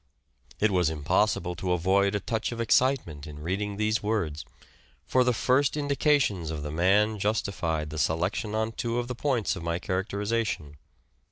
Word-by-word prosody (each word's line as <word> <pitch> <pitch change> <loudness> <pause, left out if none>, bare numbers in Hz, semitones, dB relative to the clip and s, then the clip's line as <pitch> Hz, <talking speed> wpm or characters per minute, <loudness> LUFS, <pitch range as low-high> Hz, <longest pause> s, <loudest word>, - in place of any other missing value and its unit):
It 110 0 +3
was 90 -4 +2
impossible 90 +5 +1
to 90 +1 -1
avoid 100 +3 +2
a - - +1
touch 110 +3 -2
of 120 - -6
excitement 115 - +1
in 75 -1 -9
reading 100 +4 -2
these 110 +1 +1
words; 90 - -1 0.6
for 130 - +3
the 125 - +3
first 130 +5 +2
indications 140 - +1
of 75 -2 -4
the 75 - -4
man 100 +6 +2
justified 95 -7 -1
the 75 - -4
selection 90 +9 0
on 110 +1 0
two 115 +1 -2
of 120 0 -1
the 125 - -3
points 125 -3 0
of - - -7
my 85 0 -1
characterization. 95 -4 -2
100 Hz, 165 wpm, -27 LUFS, 85-115 Hz, 0.6 s, It